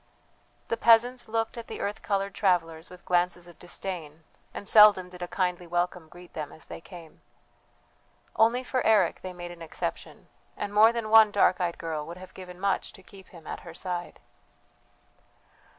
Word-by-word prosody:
The 230 - 0
peasants 240 +2 +4
looked 225 +1 -2
at 230 - -9
the - - -7
earth 205 +1 -3
coloured 200 -1 -1
travellers 165 -4 0
with 180 -1 -14
glances 175 0 0
of 170 -3 -16
disdain; 170 -4 -6 0.3
and 200 - -8
seldom 210 -4 +7
did 180 0 -13
a 175 - -3
kindly 180 -1 -2
welcome 175 -1 -2
greet 175 +1 -15
them 150 -2 -5
as 160 - -12
they - - -9
came. 170 -3 -13 1.1
Only 235 +3 +3
for 255 0 -1
Eric 205 -6 +3
they 185 - -6
made 175 -1 -8
an 175 -1 -12
exception, 165 - -6 0.3
and 205 - -4
more 220 +2 +7
than 230 -2 -4
one 220 -1 +8
dark 200 -3 +3
eyed 170 -1 -1
girl 160 -2 -4
would 170 +1 -8
have 185 0 -12
given 180 -1 -11
much 195 0 -1
to 190 - -14
keep 190 0 -15
him 170 -3 -15
at - - -6
her 165 -1 -12
side. 175 -1 -5
180 Hz, 180 wpm, -27 LUFS, 175-210 Hz, 1.1 s, one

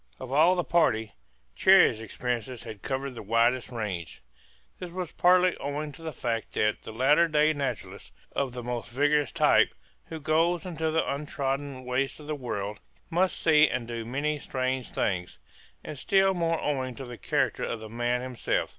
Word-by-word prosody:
Of 130 0 -6
all 165 +6 +5
the 175 - 0
party 110 -12 +2 0.4
Cherrie's 180 - +6
experiences 120 +1 -4
had 110 -4 -9
covered 135 0 -3
the 120 - -8
widest 115 +4 +2
range. 100 - -5 0.6
This 180 - -6
was 180 -1 -5
partly 180 0 +4
owing 145 +2 -4
to 145 - -13
the 160 -1 -4
fact 115 -4 -3
that 105 0 +1
the - - -8
latter 145 +9 +4
day 155 0 +3
naturalist 140 -2 -5 0.2
of 135 -2 0
the 125 0 -7
most 120 -1 -4
vigorous 145 +3 +2
type - - +4 0.3
who 160 - -7
goes 165 +3 +1
into 160 -3 -2
the 160 +1 +1
untrodden 140 -2 -3
wastes 130 +3 -1
of 150 - -11
the 155 - -3
world 105 -7 -4 0.3
must 180 +3 +1
see 155 -2 +5
and 120 -2 -3
do 115 -1 -4
many 145 +6 -2
strange 130 -2 -2
things; 90 - -2 0.5
and 145 - -7
still 195 +5 +3
more 165 -2 0
owing 130 -4 -2
to 135 - -7
the 120 -2 -9
character 135 -7 0
of 115 - -3
the 110 - -8
man 120 +2 -1
himself. 125 -2 -1
135 Hz, 175 wpm, -28 LUFS, 120-155 Hz, 0.6 s, Cherrie's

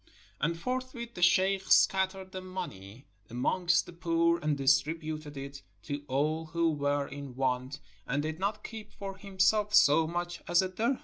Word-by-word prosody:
And 165 +3 0
forthwith 250 +2 -4
the 175 - -7
sheikh 190 +2 +3
scattered 190 0 +3
the 185 - -6
money 135 - -7 0.2
amongst 175 +9 +1
the - - -11
poor 170 -1 +1
and 150 -2 0
distributed 150 +2 0
it 140 0 -7 0.2
to 145 +4 -4
all 155 +4 0
who 165 +1 +1
were 145 -1 0
in 140 -3 -8
want, 130 +2 -1 0.3
and 140 +3 0
did 155 +1 -4
not 200 +2 -2
keep 215 -2 -8
for 195 -1 -7
himself 200 +2 +2
so 160 -2 +6
much 175 +1 -4
as 175 +2 +4
a 185 - -2
dirhem. 230 +8 0
170 Hz, 165 wpm, -30 LUFS, 145-190 Hz, 0.3 s, so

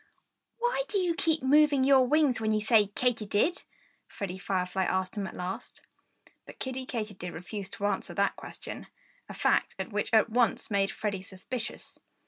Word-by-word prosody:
"Why 485 +1 +1
do 410 - -1
you 360 -3 +2
keep 320 -3 +1
moving 290 0 +5
your 265 -1 +5
wings 285 -5 +3
when 215 0 +1
you 215 - +2
say 215 -1 +4
Katy 225 +1 0
did?" 305 - +1 0.5
Freddie 190 -2 -5
Firefly 190 -1 -1
asked 185 0 -1
him 200 -2 -2
at - - -9
last. 180 +1 -6 0.7
But - - -11
Kiddie 260 0 -4 0.4
refused 190 +3 -7
to 200 - -3
answer 205 - -1
that - - +2
question - - -8 0.4
a - - -7
fact - - +2 0.2
which 210 0 -1
at 220 -1 +5
once 235 -2 +1
made 195 -1 +2
Freddie 200 -3 -3
suspicious. 200 +5 -6
220 Hz, 160 wpm, -29 LUFS, 195-265 Hz, 0.7 s, moving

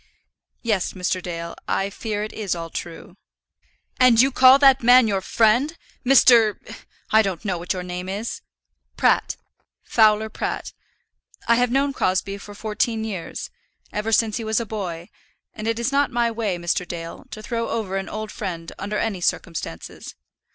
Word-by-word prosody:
"Yes, 210 -6 0
Mr. 185 0 -2
Dale; 170 -1 -5
I 195 +1 -1
fear 210 0 -3
it 215 - -6
is 205 -5 -2
all 165 -1 -6
true." 175 +3 -8 0.8
"And 250 -3 +6
you 265 +3 +5
call 260 +1 +7
that 275 -1 +5
man 245 0 +6
your 195 -2 0
friend! 240 - +2 0.3
Mr.; 240 -5 +6 0.6
I 220 - +6
don't 195 -2 -3
know 185 -4 -1
what 175 +3 -2
your 180 -1 -5
name 180 +1 -5
is." 205 +4 -4 0.6
"Pratt; - - +2 0.5
Fowler 220 -1 +3
Pratt. 220 - -4 0.7
I 235 - +5
have 245 0 +2
known 275 +3 +1
Crosbie 195 -1 -1
for 205 +1 -11
fourteen 220 +1 -1
years, 200 -6 -6 0.4
ever 210 +2 -2
since 220 -1 +2
he 230 - -4
was 220 +1 0
a 235 - -3
boy; 185 -6 -5 0.5
and 215 0 -6
it 230 0 0
is 235 +3 -1
not 280 +1 +2
my 240 -1 0
way, 220 -5 -2
Mr. 175 +1 -1
Dale, 165 -1 -7
to 215 0 -9
throw 230 +1 -3
over 215 -4 -3
an 195 0 -3
old 215 0 -5
friend 170 -4 -5
under 210 +2 -3
any 205 -5 -2
circumstances." 160 - -4
215 Hz, 165 wpm, -22 LUFS, 185-230 Hz, 0.8 s, call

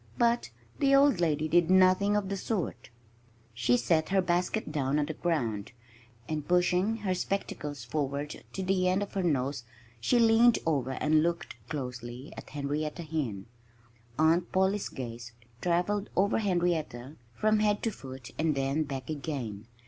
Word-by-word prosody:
But 235 - +2 0.3
the 275 0 +4
old 275 -8 +5
lady 155 -2 +1
did 170 +1 +3
nothing 185 +2 +5
of 205 -2 0
the 200 - -1
sort. 195 -1 -3 0.6
She 120 +1 +2
set 155 +3 +1
her 195 0 +3
basket 180 +1 0
down 140 -1 0
on 150 - +2
the 155 - -4
ground; 120 - -2 0.5
and 155 -2 -3
pushing 180 +4 +2
her 185 - +2
spectacles 150 - -3
forward 140 +3 -3
to 190 - -3
the 185 -1 +1
end 190 +2 +1
of 205 - -8
her 195 - 0
nose, 140 -6 0 0.4
she 120 - +2
leaned 230 +1 +6
over 135 -5 0
and 155 +3 +3
looked 170 +1 -2
closely 125 -2 -6
at - - -10
Henrietta 150 +3 -3
Hen. 135 -12 -3 0.7
Aunt 165 +3 +3
Polly's 190 +2 +1
gaze 120 -2 -7 0.3
travelled 180 +4 0
over 200 +4 +2
Henrietta 170 - -1 0.2
from 215 - +2
head 210 -1 +1
to 225 - +1
foot 130 - -10
and 155 -2 +2
then 135 +3 0
back 135 -4 -4
again. 135 -9 -4
160 Hz, 155 wpm, -29 LUFS, 135-190 Hz, 0.7 s, leaned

